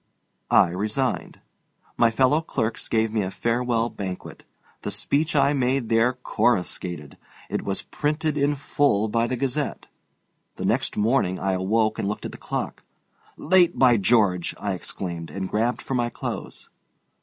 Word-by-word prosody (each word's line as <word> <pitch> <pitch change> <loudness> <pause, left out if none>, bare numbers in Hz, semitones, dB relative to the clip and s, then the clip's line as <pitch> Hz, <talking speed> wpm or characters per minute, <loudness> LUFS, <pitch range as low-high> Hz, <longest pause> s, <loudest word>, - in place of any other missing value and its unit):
I - - +5
resigned. 105 +8 -2 0.5
My 115 - +4
fellow 130 +6 +3
clerks 110 -8 -2
gave 110 -1 +1
me 110 - +1
a 95 - -2
farewell 120 +2 0
banquet. 95 -4 -7 0.4
The - - -3
speech 155 +3 0
I 145 0 +4
made 130 -3 0
there 115 +2 +3
coruscated. 90 - -1 0.3
It - - -1
was 100 -1 -3
printed 150 +1 -1
in 145 0 +2
full 135 -6 +1
by 115 +2 +1
the 130 - -2
Gazette. 135 +2 -2 0.7
The - - -4
next - - 0
morning 105 -4 +2
I 95 - 0
awoke 110 +4 +1
and - - -1
looked 105 - -3
at - - -4
the - - -11
clock. - - -4 0.6
"Late, 180 +1 +3
by 125 -3 +5
George!" 95 -4 +2
I 100 -2 -2
exclaimed, 85 -2 -5
and 95 +5 -4
grabbed 115 +5 0
for - - -4
my 120 -2 +1
clothes. - - -6
115 Hz, 155 wpm, -24 LUFS, 100-135 Hz, 0.7 s, I